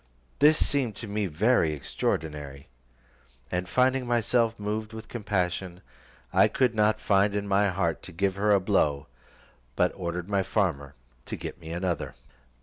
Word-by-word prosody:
This 150 +2 +6
seemed 130 -7 0
to 115 - -7
me 105 0 -1
very 85 0 +2
extraordinary, 75 -2 -3 0.8
and 90 0 -2
finding 130 0 +2
myself 115 -1 +1
moved 110 +2 -3
with 110 0 -8
compassion, 95 -5 -2 0.5
I - - +6
could 125 -3 +1
not 110 0 +2
find 100 0 +2
in 100 0 -2
my 100 +1 +3
heart 85 -3 -1
to - - -8
give 95 +3 0
her 100 +2 0
a 100 -1 +5
blow, 75 -8 +1 0.7
but - - +2
ordered 85 0 -4
my 100 -1 +1
farmer 90 -8 -1 0.3
to - - -4
get 90 - -7
me 80 - -9
another. 90 +1 -2
100 Hz, 150 wpm, -27 LUFS, 85-110 Hz, 0.8 s, This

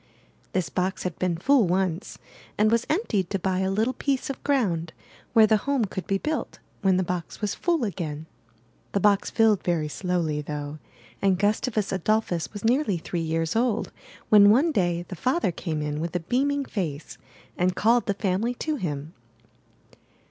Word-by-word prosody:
This 185 -3 0
box 185 +1 -2
had 180 -3 -4
been 180 -2 0
full 250 +3 +4
once, 185 +1 -1 0.4
and 215 +1 +3
was 230 +1 +1
emptied 220 - 0
to 195 - 0
buy 185 0 -1
a 190 0 +1
little 220 +6 +1
piece 275 -1 -1
of 270 - -10
ground 180 - 0 0.4
where 220 -1 +7
the 215 0 +4
home 270 +1 0
could 190 -1 -6
be 195 - +1
built 310 +9 -3 0.2
when 190 -3 +3
the 185 - +2
box 175 -1 -4
was 210 -2 -1
full 340 -6 0
again. 160 -7 -4 0.7
The 200 - +2
box 200 0 +3
filled 220 -3 +3
very 165 -4 0
slowly, 165 -2 -1
though; 150 0 -5 0.4
and 195 -2 +3
Gustavus 215 +1 0
Adolphus 190 -2 0
was 205 0 -7
nearly 235 - +2
three 170 +1 -4
years 165 +1 -1
old 230 -1 +1 0.4
when 205 -1 +8
one 275 +10 +4
day 175 - 0
the 185 - -6
father 255 - +1
came 155 -2 -3
in 150 0 -3
with 170 +1 -4
a - - +2
beaming 275 - 0
face 165 - -4 0.4
and 180 +1 +1
called 235 +4 +3
the 200 - 0
family 205 +5 0
to 310 +4 -2
him. 150 - -4
195 Hz, 175 wpm, -25 LUFS, 170-225 Hz, 0.7 s, when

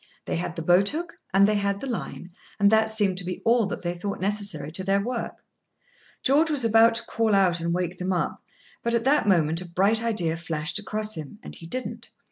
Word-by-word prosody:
They - - -2
had 170 0 -4
the 165 - -4
boat 180 +4 +4
hook 335 +3 -6
and 195 +1 +5
they 215 - +2
had 200 -1 0
the - - -6
line, 220 -7 -5 0.3
and 200 +1 +5
that 220 0 +4
seemed 205 -4 +1
to - - -6
be 180 0 -5
all 230 -2 +3
that 195 - -6
they 175 0 -1
thought 200 +3 -5
necessary 195 -6 0
to 185 +3 -3
their 195 +1 +2
work. 235 +3 -4 0.8
George 300 +5 +4
was 285 -6 +1
about 225 +1 +5
to 230 0 0
call 225 -2 +1
out 185 -3 +3
and 170 0 -2
wake 180 0 -2
them 185 +1 -2
up, 180 -2 -2 0.4
but, 235 0 0
at 230 - 0
that 275 -3 +2
moment, 165 -3 +2
a 180 - -9
bright 200 +6 +2
idea 190 -8 0
flashed 165 +2 -3
across 215 +1 -3
him, 155 +3 -8
and - - -9
he 165 - -10
didn't. 255 +8 -5
200 Hz, 225 wpm, -25 LUFS, 175-225 Hz, 0.8 s, and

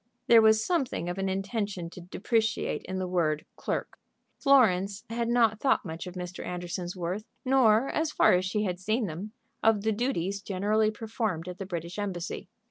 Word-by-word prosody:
There 230 -1 +7
was 220 0 +5
something 270 - -1
of 175 +2 -4
an 195 0 0
intention 195 -2 -2
to 180 - -10
depreciate 220 +5 -1
in 185 - -4
the 185 -1 -2
word 160 -4 0
"clerk." - - -4 0.4
Florence 205 -8 +4
had 235 0 -1
not 230 -3 +3
thought 265 -4 +2
much 165 +1 -6
of 180 - -8
Mr. 180 0 -6
Anderson's 180 0 -4
worth, 185 +4 -3 0.2
nor, 255 -2 +4
as 315 0 0
far - - +5
as 180 0 +3
she 200 +3 -1
had 180 -3 -2
seen 220 +5 0
them, 190 +5 -6 0.3
of 220 -2 +3
the 220 - +2
duties 200 -4 -1
generally 210 +3 +1
performed 215 -6 -3
at 180 0 -7
the 195 - -5
British 170 +1 -5
Embassy. 185 -3 -4
200 Hz, 180 wpm, -28 LUFS, 180-220 Hz, 0.4 s, There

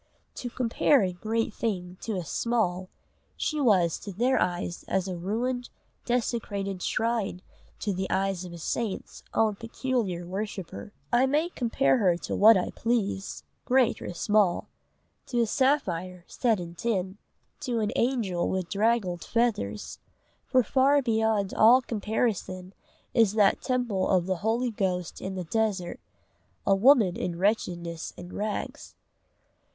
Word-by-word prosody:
To 245 - -5
compare 245 +1 +2
a 185 -1 -1
great 220 +4 -2
thing 180 -6 -3
to 220 - -3
a 180 -3 -3
small, 185 -4 -1 0.5
she 305 - -1
was 185 - +3
to 200 - -7
their 245 +7 +1
eyes 175 -1 -2
as 190 0 0
a 185 - -3
ruined, 240 +8 -2 0.4
desecrated 205 -6 -2
shrine 220 -5 -1 0.4
to 205 - -1
the 190 0 -3
eyes 195 -1 0
of 180 - -7
the 170 - -8
saint's 205 +5 -3
own 215 -2 +2
peculiar 225 -6 -2
worshipper. 190 - -5 0.2
I 250 +2 +5
may 300 +5 +1
compare 255 -2 +1
her 180 -5 +3
to - - -4
what 220 +1 +7
I 180 - -1
please, 210 -4 -2 0.2
great 255 -2 +3
or - - -5
small 205 -1 +2 0.6
to 240 -2 +1
a - - +3
sapphire 185 - 0
set 230 -5 0
in 170 -1 -7
tin, 190 0 -2 0.4
to 245 -4 -2
an 210 -1 0
angel 225 -9 0
with 185 -2 -2
draggled 200 -5 +1
feathers; 205 - -1 0.5
for 255 -1 +4
far 275 +5 +3
beyond 220 -4 +1
all 235 +4 +7
comparison 210 -5 -2 0.4
is 225 -4 +4
that 210 -3 +3
temple 245 -7 0
of 185 -3 +3
the 185 -1 -1
holy 230 +6 0
ghost 180 -5 -2
in 190 0 -4
the 185 - -3
desert 200 -1 -1 0.7
a 195 - +4
woman 215 -3 +5
in 170 -2 -3
wretchedness 175 -4 -1
and 175 0 -9
rags. 210 0 -4
205 Hz, 145 wpm, -27 LUFS, 185-235 Hz, 0.7 s, what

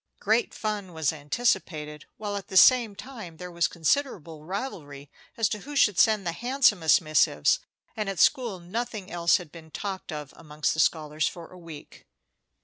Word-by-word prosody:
Great 220 +3 +1
fun 210 -4 -4
was 160 -2 0
anticipated, 150 -2 -2
while 205 -1 -4
at 200 - -6
the 190 - -1
same 235 -2 +6
time 200 -6 -10
there 180 +1 -8
was 170 0 +1
considerable 170 - -1
rivalry 155 - -6 0.3
as 225 -2 +2
to 210 - -4
who 290 +7 -9
should 210 -9 +3
send 215 -3 +4
the 170 - 0
handsomest 225 - +3
missives, 155 -2 +2 0.4
and 215 -3 -2
at 195 - -4
school 240 -9 +2
nothing 210 +2 -5
else 170 -1 +3
had 175 -6 -11
been 160 -1 -13
talked 190 +3 -5
of 150 -3 -7
amongst 150 -1 -2
the 155 - -5
scholars 155 -1 +1
for 170 -2 -8
a 185 - -13
week. 165 -4 -12
180 Hz, 170 wpm, -26 LUFS, 160-215 Hz, 0.4 s, same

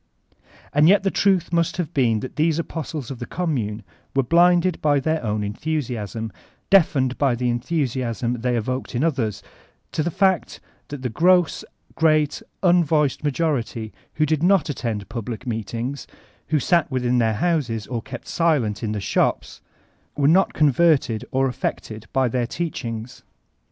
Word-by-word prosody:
And 150 +3 +5
yet 200 0 +5
the 195 - +1
truth 185 -4 +1
must 170 -1 +1
have 175 -2 -3
been 115 -6 +2
that 130 - -7
these 160 0 +2
apostles 160 -5 -5
of 130 - -7
the 120 - -6
Commune 120 - -2 0.3
were 135 - +3
blinded 175 +4 +3
by 145 -2 +3
their 155 +2 -1
own 105 -1 -1
enthusiasm, 115 - -3 0.4
deafened 140 -9 +3
by 135 -4 +2
the 120 0 0
enthusiasm 120 -3 -2
they 125 0 0
evoked 130 +3 -3
in 120 - 0
others, 130 - -1 0.5
to - - -1
the 165 - 0
fact 190 0 +1 0.3
that 145 -2 -7
the 175 +8 +2 0.3
great 155 -3 +2 0.2
unvoiced 160 -6 +3
majority 135 -7 -1 0.2
who 155 - +2
did 155 0 0
not 185 -1 +3
attend 115 -7 -3
public 115 +1 -6
meetings, 120 +4 -4 0.4
who 155 -1 +1
sat 170 +3 +2
within 125 -2 +1
their 110 -2 +2
houses 120 - 0
or 120 0 -4
kept 130 0 -9
silent 140 -11 +1
in 110 -2 -2
tile 105 - -3
shops, - - -1 0.6
were 140 -1 +3
not 180 +5 +4
converted 150 -6 +3
or 135 +1 +1
affected 110 -3 -4
by 130 -1 +2
their 120 0 -1
teachinss. 120 -8 -5
135 Hz, 150 wpm, -22 LUFS, 115-160 Hz, 0.6 s, And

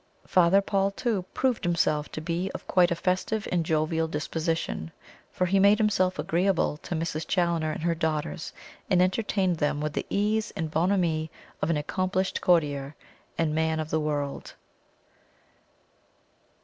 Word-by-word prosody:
Father 185 +2 +4
Paul, 195 0 +1
too, 200 -2 -2
proved 255 -3 +1
himself 160 -4 +1
to 155 - -4
be 170 +3 -2
of - - -7
quite 180 -2 +4
a 170 - 0
festive 185 +5 -1
and 175 -2 +1
jovial 160 +1 0
disposition, 160 - -2 0.4
for 180 - 0
he 195 +2 +2
made 200 +2 +6
himself 195 -4 +2
agreeable 175 -3 +1
to 175 - -5
Mrs. 160 -1 -3
Challoner 170 -3 +1
and 155 - -5
her 170 0 +2
daughters, 160 0 -2 0.4
and 185 -3 +4
entertained 185 -1 +1
them 150 -1 0
with 150 0 -2
the - - -3
ease 210 +2 +1
and 160 -1 -3
bonhomie 165 -2 +1 0.3
of - - 0
an 165 - +2
accomplished 185 +5 -1
courtier 145 -5 +1 0.4
and 160 -2 +1
man 160 0 +1
of 155 0 -4
the 160 - +2
world. 145 -2 -3
170 Hz, 150 wpm, -27 LUFS, 155-185 Hz, 0.4 s, made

